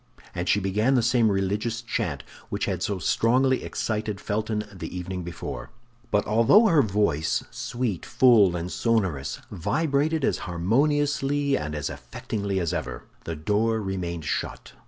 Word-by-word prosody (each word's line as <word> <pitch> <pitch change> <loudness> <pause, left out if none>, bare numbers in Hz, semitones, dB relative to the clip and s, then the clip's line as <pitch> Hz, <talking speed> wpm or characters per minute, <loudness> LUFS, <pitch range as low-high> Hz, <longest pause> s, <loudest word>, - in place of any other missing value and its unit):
And 85 +1 -2
she 105 - +4
began 105 +7 +1
the 120 - +3
same 120 -2 +3
religious 105 +4 -1
chant 120 - -3 0.3
which - - -1
had - - -2
so 100 - -1
strongly 130 +8 +2
excited 105 -2 -2
Felton 105 +1 -2
the 90 -1 -6
evening 90 +1 -4
before. 70 -7 -6 0.4
But 105 - +1
although 115 - +5
her 165 -9 +5
voice—sweet, 105 - -1
full, 110 -8 +5
and 85 +1 -4
sonorous—vibrated 115 - 0
as - - 0
harmoniously 140 - +1
and 75 - -3
as 75 -2 -3
affectingly 100 -2 -4
as 85 -3 -1
ever, - - -4 0.2
the 85 - -3
door 105 +8 +1
remained 90 -5 -4
shut. - - -3
105 Hz, 135 wpm, -25 LUFS, 90-125 Hz, 0.4 s, although